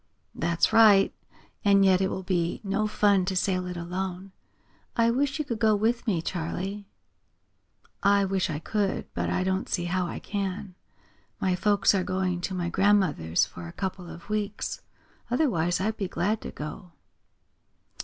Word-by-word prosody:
"That's 170 Hz, +5 st, +1 dB
right. 210 Hz, -3 st, +6 dB, 0.5 s
And 200 Hz, -1 st, +5 dB
yet 190 Hz, -1 st, +4 dB
it 190 Hz, -, +1 dB
will 190 Hz, -, -4 dB
be 175 Hz, -2 st, -1 dB
no 200 Hz, +2 st, 0 dB
fun 205 Hz, -2 st, +3 dB
to 190 Hz, 0 st, -2 dB
sail 185 Hz, -1 st, 0 dB
it 180 Hz, -1 st, -5 dB
alone. 185 Hz, +2 st, -4 dB, 0.6 s
I 230 Hz, 0 st, +3 dB
wish 275 Hz, +3 st, 0 dB
you 305 Hz, -, -2 dB
could 235 Hz, -5 st, -4 dB
go 220 Hz, -2 st, +4 dB
with 230 Hz, +4 st, 0 dB
me, 175 Hz, -6 st, +1 dB
Charley." 190 Hz, +4 st, -4 dB, 1.1 s
"I 200 Hz, 0 st, +4 dB
wish 190 Hz, -1 st, 0 dB
I 155 Hz, -, -2 dB
could, 200 Hz, +4 st, -1 dB
but -, -, -2 dB
I 185 Hz, -, 0 dB
don't 190 Hz, 0 st, -1 dB
see 175 Hz, -2 st, -1 dB
how 180 Hz, 0 st, 0 dB
I -, -, -5 dB
can. 195 Hz, -1 st, -4 dB, 0.7 s
My 185 Hz, -1 st, +1 dB
folks 205 Hz, +2 st, +3 dB
are 190 Hz, -2 st, +1 dB
going 185 Hz, -1 st, -1 dB
to 190 Hz, +1 st, -3 dB
my 175 Hz, -1 st, -2 dB
grandmother's 175 Hz, -, +2 dB
for 85 Hz, -1 st, -9 dB
a -, -, -8 dB
couple 185 Hz, -2 st, -4 dB
of 170 Hz, -, -11 dB
weeks. 210 Hz, -1 st, -3 dB, 0.5 s
Otherwise 215 Hz, -, +1 dB
I'd 215 Hz, +3 st, -1 dB
be 195 Hz, -, -2 dB
glad 200 Hz, +5 st, -1 dB
to -, -, -6 dB
go." 150 Hz, +4 st, -8 dB
190 Hz, 165 wpm, -27 LUFS, 180-205 Hz, 1.1 s, right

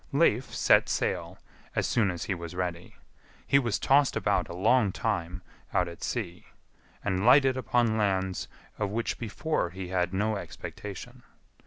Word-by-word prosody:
Leif -, -, +2 dB
set -, -, +4 dB
sail -, -, -1 dB, 0.4 s
as -, -, +1 dB
soon 110 Hz, -5 st, +2 dB
as 90 Hz, -2 st, -4 dB
he 100 Hz, -, -1 dB
was 85 Hz, -1 st, -7 dB
ready. 90 Hz, -1 st, -4 dB, 0.5 s
He 140 Hz, -, +4 dB
was 115 Hz, -6 st, 0 dB
tossed 140 Hz, 0 st, +3 dB
about -, -, +1 dB
a 85 Hz, -, -6 dB
long 105 Hz, +2 st, +3 dB
time 90 Hz, -5 st, -2 dB, 0.3 s
out -, -, +3 dB
at 85 Hz, -1 st, -9 dB
sea, 95 Hz, -8 st, -4 dB, 0.6 s
and 95 Hz, -2 st, 0 dB
lighted 130 Hz, +2 st, +6 dB
upon 120 Hz, -3 st, +1 dB
lands 95 Hz, -2 st, 0 dB, 0.3 s
of 105 Hz, -2 st, 0 dB
which 115 Hz, +3 st, -2 dB
before 120 Hz, -, -1 dB
he 90 Hz, 0 st, -7 dB
had 90 Hz, -1 st, 0 dB
no 105 Hz, +3 st, 0 dB
expectation. 100 Hz, 0 st, -8 dB
100 Hz, 155 wpm, -28 LUFS, 90-115 Hz, 0.6 s, lighted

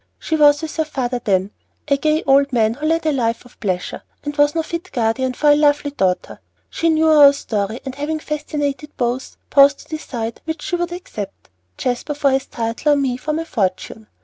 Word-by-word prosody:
She 320 Hz, -, -2 dB
was 295 Hz, 0 st, +5 dB
with 315 Hz, -, -5 dB
her 320 Hz, -, +2 dB
father 250 Hz, -5 st, -3 dB
then, 195 Hz, -2 st, +1 dB, 0.4 s
a 280 Hz, -, +3 dB
gay 305 Hz, +3 st, +1 dB
old 275 Hz, +1 st, +4 dB
man 225 Hz, -3 st, +2 dB
who 295 Hz, +5 st, -3 dB
led 325 Hz, 0 st, +1 dB
a 310 Hz, -, +3 dB
life 235 Hz, -4 st, -1 dB
of 245 Hz, -, -19 dB
pleasure, 185 Hz, -4 st, -3 dB, 0.2 s
and 290 Hz, 0 st, -4 dB
was 290 Hz, +1 st, +3 dB
no 325 Hz, -, +1 dB
fit 340 Hz, +3 st, -6 dB
guardian 250 Hz, +2 st, 0 dB
for 295 Hz, +2 st, +4 dB
a -, -, +6 dB
lovely 290 Hz, -1 st, +2 dB
daughter. 190 Hz, -9 st, -1 dB, 0.3 s
She 335 Hz, -, 0 dB
knew 320 Hz, 0 st, +3 dB
our 295 Hz, -3 st, +8 dB
story 220 Hz, -4 st, -3 dB
and, 265 Hz, -, -4 dB
having 295 Hz, +3 st, -3 dB
fascinated 300 Hz, -1 st, -4 dB
both, 245 Hz, +1 st, -2 dB
paused 280 Hz, 0 st, +6 dB
to -, -, -18 dB
decide 230 Hz, -7 st, -5 dB
which 320 Hz, +1 st, -4 dB
she 355 Hz, -, -1 dB
would 350 Hz, 0 st, -2 dB
accept: 210 Hz, -, -8 dB, 0.3 s
Jasper, 255 Hz, +4 st, -2 dB
for 280 Hz, -1 st, +2 dB
his 265 Hz, 0 st, 0 dB
title, 230 Hz, +6 st, 0 dB
or -, -, +4 dB
me, 270 Hz, -3 st, 0 dB
for 305 Hz, +5 st, -3 dB
my 325 Hz, +2 st, -1 dB
fortune. 215 Hz, -, -3 dB
280 Hz, 205 wpm, -19 LUFS, 240-305 Hz, 0.4 s, our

